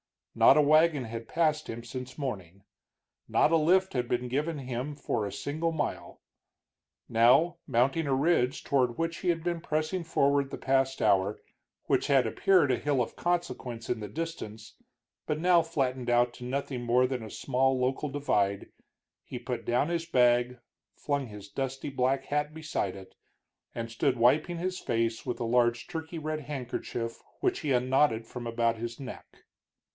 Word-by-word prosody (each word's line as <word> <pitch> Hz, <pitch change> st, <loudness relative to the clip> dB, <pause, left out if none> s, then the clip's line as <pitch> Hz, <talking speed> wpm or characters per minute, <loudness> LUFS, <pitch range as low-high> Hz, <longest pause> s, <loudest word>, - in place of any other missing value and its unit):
Not -, -, +6 dB
a -, -, +7 dB
wagon 155 Hz, -1 st, +4 dB
had 115 Hz, 0 st, -6 dB
passed 155 Hz, -2 st, +1 dB
him 115 Hz, +1 st, -6 dB
since 125 Hz, +1 st, -7 dB
morning, 100 Hz, -, -5 dB, 0.6 s
not -, -, +3 dB
a 165 Hz, -, +5 dB
lift 185 Hz, +4 st, +3 dB
had 125 Hz, -2 st, -1 dB
been 125 Hz, +1 st, -1 dB
given 150 Hz, +4 st, -1 dB
him 130 Hz, +2 st, -4 dB
for 115 Hz, -6 st, -2 dB
a -, -, -6 dB
single 150 Hz, +10 st, -2 dB
mile. 155 Hz, -2 st, -4 dB, 0.9 s
Now, 125 Hz, +9 st, +4 dB
mounting 135 Hz, +5 st, +1 dB
a 135 Hz, -, +2 dB
ridge 140 Hz, -3 st, +1 dB
toward 125 Hz, -4 st, +1 dB
which 165 Hz, 0 st, -2 dB
he 185 Hz, -, -2 dB
had 165 Hz, -2 st, 0 dB
been 170 Hz, -1 st, -2 dB
pressing 155 Hz, +4 st, -1 dB
forward 140 Hz, -3 st, +2 dB
the -, -, -6 dB
past 135 Hz, 0 st, +1 dB
hour, 100 Hz, +2 st, +2 dB, 0.5 s
which -, -, +1 dB
had 135 Hz, -3 st, +4 dB
appeared 165 Hz, -, +3 dB
a 125 Hz, -, +2 dB
hill 145 Hz, -2 st, 0 dB
of 115 Hz, -, -3 dB
consequence 170 Hz, -10 st, -2 dB
in 120 Hz, -, -1 dB
the 105 Hz, -, -5 dB
distance, 110 Hz, -, -6 dB, 0.5 s
but 150 Hz, -, 0 dB
now 175 Hz, +1 st, +4 dB
flattened 130 Hz, -6 st, -2 dB
out 120 Hz, 0 st, +3 dB
to 125 Hz, -, -9 dB
nothing 130 Hz, 0 st, -3 dB
more 120 Hz, +1 st, +3 dB
than 130 Hz, -1 st, -2 dB
a 110 Hz, -, -8 dB
small 135 Hz, +3 st, +1 dB
local 130 Hz, +3 st, -1 dB
divide, 105 Hz, -8 st, 0 dB, 0.5 s
he -, -, -7 dB
put 120 Hz, -2 st, -5 dB
down 125 Hz, +6 st, +1 dB
his 170 Hz, -1 st, -1 dB
bag, 125 Hz, -3 st, +3 dB, 0.4 s
flung 140 Hz, -2 st, -2 dB
his 105 Hz, -2 st, -10 dB
dusty 135 Hz, +5 st, -4 dB
black 135 Hz, 0 st, 0 dB
hat 150 Hz, +1 st, -1 dB
beside 155 Hz, -11 st, -3 dB
it, 95 Hz, -1 st, -12 dB, 0.6 s
and 115 Hz, -1 st, -4 dB
stood 130 Hz, +3 st, +1 dB
wiping 150 Hz, +9 st, +3 dB
his 185 Hz, +2 st, -3 dB
face 115 Hz, -1 st, -1 dB
with 125 Hz, -, -3 dB
a -, -, +1 dB
large 120 Hz, 0 st, +2 dB
turkey 160 Hz, 0 st, -6 dB
red 155 Hz, 0 st, -3 dB
handkerchief 125 Hz, -4 st, -5 dB, 0.2 s
which 375 Hz, -1 st, +1 dB
he 150 Hz, -4 st, -2 dB
unknotted 125 Hz, -2 st, +2 dB
from 120 Hz, +1 st, -7 dB
about 115 Hz, 0 st, +1 dB
his 115 Hz, +1 st, -5 dB
neck. 130 Hz, -2 st, -10 dB
130 Hz, 170 wpm, -29 LUFS, 120-155 Hz, 0.9 s, a